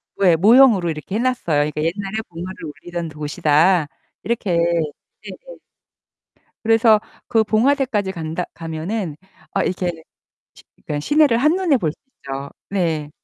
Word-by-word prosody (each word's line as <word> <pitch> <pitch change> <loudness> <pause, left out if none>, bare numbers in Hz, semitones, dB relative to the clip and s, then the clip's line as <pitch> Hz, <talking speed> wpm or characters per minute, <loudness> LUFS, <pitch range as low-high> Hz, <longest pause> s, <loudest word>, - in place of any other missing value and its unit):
왜 180 -4 +4
모형으로 215 -1 +5
이렇게 160 +5 -5
해놨어요. 230 -11 +1
그니까 150 - -4
'옛날에 195 +5 -2
봉화를 175 0 -7 0.2
올리던 175 -2 -5
곳이다.' 155 +2 +2 0.4
이렇게. 220 -5 -2 0.7
네네. - - -11 1.1
그래서 225 -1 +5 0.3
그 225 -1 +3
봉화대까지 225 -2 +1
간다 165 -1 -4
가면은 165 +2 -4 0.4
아 195 - +1
이렇게 180 0 -1 0.6
시 - - -18
그니까 145 -1 -5
시내를 295 - +3
한눈에 310 +2 +3
볼 165 -9 -1
수 - - -25 0.2
있죠. 135 +1 -6 0.2
네. 160 -6 -1
185 Hz, 295 characters per minute, -20 LUFS, 160-225 Hz, 1.1 s, 모형으로